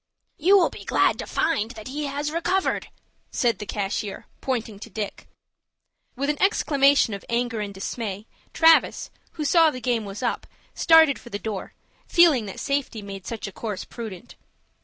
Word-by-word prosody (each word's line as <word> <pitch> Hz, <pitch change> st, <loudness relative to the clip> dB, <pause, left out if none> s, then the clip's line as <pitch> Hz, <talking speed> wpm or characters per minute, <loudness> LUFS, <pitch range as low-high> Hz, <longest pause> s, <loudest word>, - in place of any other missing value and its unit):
"You 380 Hz, +6 st, +6 dB
will 360 Hz, -, +3 dB
be -, -, -10 dB
glad -, -, +2 dB
to -, -, -5 dB
find 230 Hz, -10 st, 0 dB
that 215 Hz, +3 st, -8 dB
he 295 Hz, +3 st, -3 dB
has 290 Hz, +2 st, -3 dB
recovered," 350 Hz, +4 st, 0 dB, 0.4 s
said 235 Hz, -5 st, 0 dB
the 210 Hz, -, -6 dB
cashier, 200 Hz, 0 st, -3 dB, 0.2 s
pointing 230 Hz, -6 st, -3 dB
to 230 Hz, -, -9 dB
Dick. 210 Hz, 0 st, -6 dB, 0.9 s
With 275 Hz, +2 st, -2 dB
an 295 Hz, 0 st, -1 dB
exclamation 280 Hz, -, +3 dB
of 200 Hz, -, -6 dB
anger 235 Hz, -1 st, -1 dB
and 205 Hz, -1 st, -3 dB
dismay, 200 Hz, +1 st, -5 dB, 0.3 s
Travis, 325 Hz, 0 st, +4 dB, 0.2 s
who 305 Hz, -, -4 dB
saw 325 Hz, +2 st, +5 dB
the 255 Hz, -, -6 dB
game 240 Hz, -2 st, 0 dB
was 200 Hz, +3 st, -7 dB
up, 240 Hz, -, -2 dB, 0.3 s
started 320 Hz, -4 st, +5 dB
for 240 Hz, -, -13 dB
the 205 Hz, -, -3 dB
door, 205 Hz, -2 st, -6 dB, 0.3 s
feeling 310 Hz, -, +5 dB
that 195 Hz, -, -7 dB
safety 275 Hz, -6 st, -2 dB
made 195 Hz, -1 st, -8 dB
such 230 Hz, -2 st, -5 dB
a 200 Hz, -, -6 dB
course 205 Hz, -2 st, -5 dB
prudent. 225 Hz, -1 st, -8 dB
240 Hz, 170 wpm, -24 LUFS, 210-295 Hz, 0.9 s, You